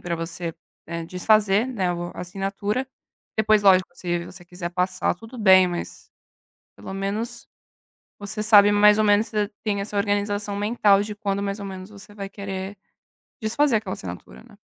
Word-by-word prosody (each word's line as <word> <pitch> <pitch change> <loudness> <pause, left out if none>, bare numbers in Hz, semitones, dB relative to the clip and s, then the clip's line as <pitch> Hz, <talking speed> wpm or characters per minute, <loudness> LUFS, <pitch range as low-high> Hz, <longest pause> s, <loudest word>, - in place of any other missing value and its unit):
pra 170 -1 -3
você, 165 0 -5 0.3
eh, 170 0 -5
desfazer, 205 +4 +2
né, 190 -8 -1
o 175 0 -4
a - - -7
assinatura. 195 +7 -3 0.5
Depois, 215 -1 +3
lógico, 185 -2 +5
se 175 -1 -3
você 175 0 -11
quiser 175 0 -6
passar, 180 +1 0
tudo 225 +7 -12
bem, 190 -3 +6
mas 175 -1 -7 0.7
pelo 190 - -8
menos 210 +5 -4 0.7
você 205 +1 -5
sabe 205 -2 +7
mais 205 0 +5
ou 215 - +3
menos 205 +1 +4
você 210 -2 -1 0.2
tem 205 -2 0
essa 205 +1 -5
organização 205 0 0
mental 205 -1 +3
de 210 0 -6
quando 200 -2 -2
mais 200 +1 -3
ou 200 - -6
menos 190 0 -8
você 205 0 -14
vai 200 -1 -6
querer 195 0 -6 0.6
desfazer 235 +4 +2
aquela 205 -3 -5
assinatura, 85 -8 -9
né. - - -19
200 Hz, 165 wpm, -23 LUFS, 185-210 Hz, 0.7 s, sabe